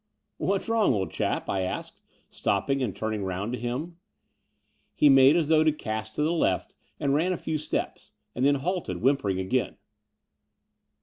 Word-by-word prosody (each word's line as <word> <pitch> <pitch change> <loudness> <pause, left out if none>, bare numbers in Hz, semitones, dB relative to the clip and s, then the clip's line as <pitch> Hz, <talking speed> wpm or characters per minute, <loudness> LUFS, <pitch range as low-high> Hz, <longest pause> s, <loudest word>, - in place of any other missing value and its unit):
"What's 195 0 -1
wrong, 225 - +3
old 95 -2 -2
chap?" - - -2
I 95 - -1
asked, 95 - -5 0.3
stopping 135 +8 0
and 115 -7 -2
turning 110 -2 -3
round 95 +5 -3
to 125 - -3
him. 135 +9 -4 1.0
He 150 - +5
made 135 +2 +7
as 165 -4 +1
though 155 0 +4
to 155 - +4
cast 110 -6 -5
to 150 - 0
the 160 +3 +1
left 95 - 0 0.3
and 140 -1 +1
ran 170 +6 +2
a - - -3
few 155 -1 -3
steps, 155 - -4 0.2
and 125 - -2
then 140 +1 +4
halted, 180 +6 -2
whimpering 125 -9 +2
again. 120 +7 -1
135 Hz, 170 wpm, -27 LUFS, 110-155 Hz, 1.0 s, made